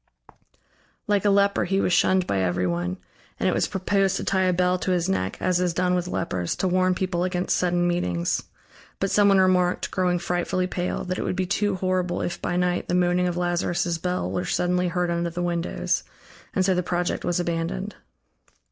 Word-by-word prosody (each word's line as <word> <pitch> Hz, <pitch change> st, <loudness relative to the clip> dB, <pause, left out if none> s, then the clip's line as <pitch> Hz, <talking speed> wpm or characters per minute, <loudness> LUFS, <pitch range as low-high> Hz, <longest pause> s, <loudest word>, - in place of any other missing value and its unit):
Like 205 Hz, -1 st, +1 dB
a -, -, +5 dB
leper 200 Hz, -2 st, +3 dB
he 195 Hz, +2 st, +1 dB
was 180 Hz, -, +1 dB
shunned 185 Hz, 0 st, +3 dB
by 100 Hz, -, 0 dB
everyone, 90 Hz, -1 st, -1 dB, 0.4 s
and -, -, +1 dB
it -, -, +2 dB
was -, -, +1 dB
proposed 195 Hz, 0 st, +1 dB
to -, -, -4 dB
tie 190 Hz, -1 st, +1 dB
a 185 Hz, -, +3 dB
bell 180 Hz, +1 st, +1 dB
to -, -, -3 dB
his 180 Hz, -1 st, +1 dB
neck, 95 Hz, -, -1 dB
as 180 Hz, -1 st, +1 dB
is 180 Hz, -2 st, 0 dB
done 180 Hz, 0 st, +1 dB
with 180 Hz, -1 st, 0 dB
lepers, 90 Hz, -, -2 dB
to 190 Hz, -, -1 dB
warn 185 Hz, 0 st, +2 dB
people 180 Hz, -2 st, -1 dB
against 180 Hz, 0 st, 0 dB
sudden 175 Hz, -1 st, +1 dB
meetings. 90 Hz, -, 0 dB, 0.6 s
But 195 Hz, -, -1 dB
someone 200 Hz, -1 st, +5 dB
remarked, 180 Hz, -1 st, +2 dB
growing 180 Hz, -2 st, +1 dB
frightfully 175 Hz, +1 st, -1 dB
pale, 180 Hz, 0 st, -3 dB
that 185 Hz, 0 st, -3 dB
it -, -, -1 dB
would -, -, -2 dB
be 185 Hz, 0 st, 0 dB
too 200 Hz, +1 st, 0 dB
horrible 185 Hz, -1 st, -1 dB
if 175 Hz, 0 st, -4 dB
by -, -, -2 dB
night 180 Hz, 0 st, 0 dB
the 175 Hz, -, 0 dB
moaning 180 Hz, 0 st, +2 dB
of 175 Hz, -1 st, -2 dB
Lazarus' 175 Hz, -1 st, 0 dB
bell 180 Hz, +1 st, -2 dB
were 180 Hz, -, -1 dB
suddenly 180 Hz, 0 st, 0 dB
heard 175 Hz, 0 st, -1 dB
under 170 Hz, 0 st, -1 dB
the 175 Hz, +1 st, -4 dB
windows, 170 Hz, -1 st, -1 dB, 0.5 s
and 190 Hz, -3 st, +2 dB
so 190 Hz, -, +3 dB
the 180 Hz, -, +1 dB
project 175 Hz, 0 st, -2 dB
was 175 Hz, 0 st, 0 dB
abandoned. 170 Hz, +4 st, -2 dB
180 Hz, 200 wpm, -24 LUFS, 175-185 Hz, 0.6 s, a